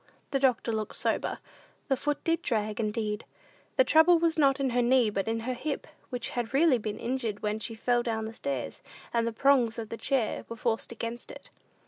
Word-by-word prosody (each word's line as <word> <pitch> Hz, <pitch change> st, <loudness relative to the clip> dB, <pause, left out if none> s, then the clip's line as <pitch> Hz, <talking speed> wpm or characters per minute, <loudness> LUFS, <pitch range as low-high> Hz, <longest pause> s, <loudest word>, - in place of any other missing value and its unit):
The 275 Hz, -, +1 dB
doctor 255 Hz, -3 st, +2 dB
looked 215 Hz, -1 st, -3 dB
sober. -, -, -1 dB, 0.5 s
The 270 Hz, -, +3 dB
foot 290 Hz, +2 st, -2 dB
did 330 Hz, +1 st, +1 dB
drag 215 Hz, -5 st, -1 dB
indeed. 210 Hz, -1 st, -1 dB, 0.5 s
The -, -, +7 dB
trouble 335 Hz, -4 st, +6 dB
was 330 Hz, -1 st, +2 dB
not 280 Hz, -3 st, +3 dB
in 270 Hz, -2 st, +1 dB
her 245 Hz, +1 st, +2 dB
knee, 240 Hz, -2 st, +4 dB
but 195 Hz, 0 st, -2 dB
in 225 Hz, 0 st, -1 dB
her 255 Hz, +3 st, -2 dB
hip, 275 Hz, +4 st, -3 dB, 0.2 s
which 245 Hz, -2 st, -3 dB
had 240 Hz, +1 st, -3 dB
really 285 Hz, -4 st, +5 dB
been 210 Hz, -1 st, -4 dB
injured 235 Hz, -4 st, -3 dB
when 210 Hz, +1 st, 0 dB
she 225 Hz, +1 st, -3 dB
fell 240 Hz, +2 st, +2 dB
down 220 Hz, -2 st, -2 dB
stairs, 280 Hz, +4 st, -4 dB, 0.3 s
and 230 Hz, -1 st, +2 dB
the -, -, 0 dB
"prongs" 245 Hz, -1 st, +3 dB
of 225 Hz, -2 st, -5 dB
the 230 Hz, -, -5 dB
chair 260 Hz, -4 st, 0 dB
were 230 Hz, -, -5 dB
forced 230 Hz, 0 st, -1 dB
against 230 Hz, +1 st, -5 dB
it. -, -, -11 dB
240 Hz, 200 wpm, -29 LUFS, 225-275 Hz, 0.5 s, The